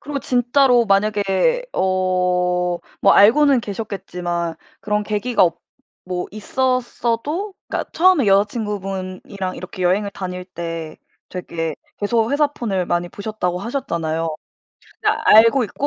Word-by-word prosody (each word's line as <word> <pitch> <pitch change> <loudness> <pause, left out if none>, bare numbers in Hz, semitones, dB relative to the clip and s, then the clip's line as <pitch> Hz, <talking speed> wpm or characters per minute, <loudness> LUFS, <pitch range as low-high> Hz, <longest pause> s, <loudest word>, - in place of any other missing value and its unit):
그리고 285 0 -4
진짜로 245 0 +3
만약에 205 - +2
어 180 -1 +1 0.2
뭐 195 - +5
알고는 260 +5 +6
계셨겠지만 180 -5 -4 0.3
그런 210 +1 -1
계기가 210 +1 0
없 170 -1 +2 0.5
뭐 180 -1 -3
있었어도 255 - -1 0.2
그러니까 - - -3
처음에 350 - +4
여자친구분이랑 195 -2 -1
이렇게 185 0 -7
여행을 195 +3 +2
다닐 180 -1 -5
때 165 -3 -6 0.3
되게 165 -4 -4 0.2
계속 225 +3 +1
회사 295 +1 +3
폰을 200 -10 -3
많이 175 0 -1
보셨다고 200 -4 -3
하셨잖아요. 165 - -2 0.7
근데 435 0 +2
알고 230 +4 +6
있고 250 +7 -3
200 Hz, 295 characters per minute, -20 LUFS, 180-240 Hz, 0.7 s, 알고는